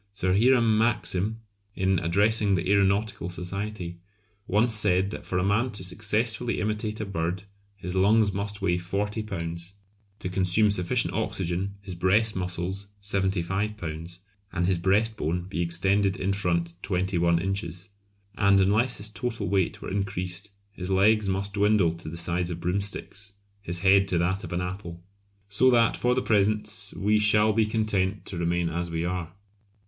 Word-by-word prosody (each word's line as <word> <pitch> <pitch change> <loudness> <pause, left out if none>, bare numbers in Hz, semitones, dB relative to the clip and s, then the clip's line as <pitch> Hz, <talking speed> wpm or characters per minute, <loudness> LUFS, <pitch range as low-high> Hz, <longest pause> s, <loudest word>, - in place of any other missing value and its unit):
Sir 95 -2 +1
Hiram 115 -1 +4
Maxim, 110 -1 +1 0.3
in 95 -1 +1
addressing 100 +4 +2
the 90 0 -2
Aeronautical 100 -1 +1
Society, 90 0 -5 0.5
once 110 +4 +2
said 100 -2 +2
that - - -8
for 90 - -1
a 90 - +1
man 105 +6 +2
to 100 - -3
successfully 110 +4 0
imitate 105 0 -2
a 110 - -2
bird 90 -1 -3 0.3
his 90 -2 -6
lungs 105 +2 +4
must 100 0 -3
weigh 90 -2 +1
40 100 +5 -2
lbs., 85 -3 -4 0.4
to 90 - -5
consume 95 +3 +3
sufficient 90 -3 0
oxygen, 95 +2 -2
his 95 -2 -6
breast 100 +5 +2
muscles 90 +2 -1
75 100 +1 -1
lbs., 85 0 -6 0.3
and 90 -1 0
his 90 -1 +1
breast 105 +5 +1
bone 85 +2 -1
be 90 -1 -4
extended 95 +3 +1
in 95 +1 0
front 85 -3 -1
21 90 -2 +1
inches. 95 -1 -4 0.5
And 100 -1 +4
unless 105 +6 +2
his 105 +1 -4
total 115 -4 -3
weight 95 -2 0
were - - -5
increased 95 0 -3 0.2
his 90 -2 -7
legs 100 +2 +3
must 100 +1 -1
dwindle 100 -4 +3
to 80 -2 -7
the 85 - -6
size 85 +1 0
of 85 -1 -5
broomsticks, 100 +2 -3 0.3
his 85 -3 -4
head 100 0 +5
to 90 - 0
that 95 +4 0
of - - -7
an 85 +1 -1
apple! 90 -2 -6 0.4
So 105 +6 +4
that 120 -2 +4
for 125 0 +1
the 130 - 0
present 105 -2 0
we 105 +2 +2
shall 105 0 +4
be 110 0 +2
content 105 -3 0
to 95 - -6
remain 85 0 0
as 85 +1 -3
we 80 0 -2
are! 90 -2 -3
95 Hz, 165 wpm, -26 LUFS, 90-105 Hz, 0.5 s, head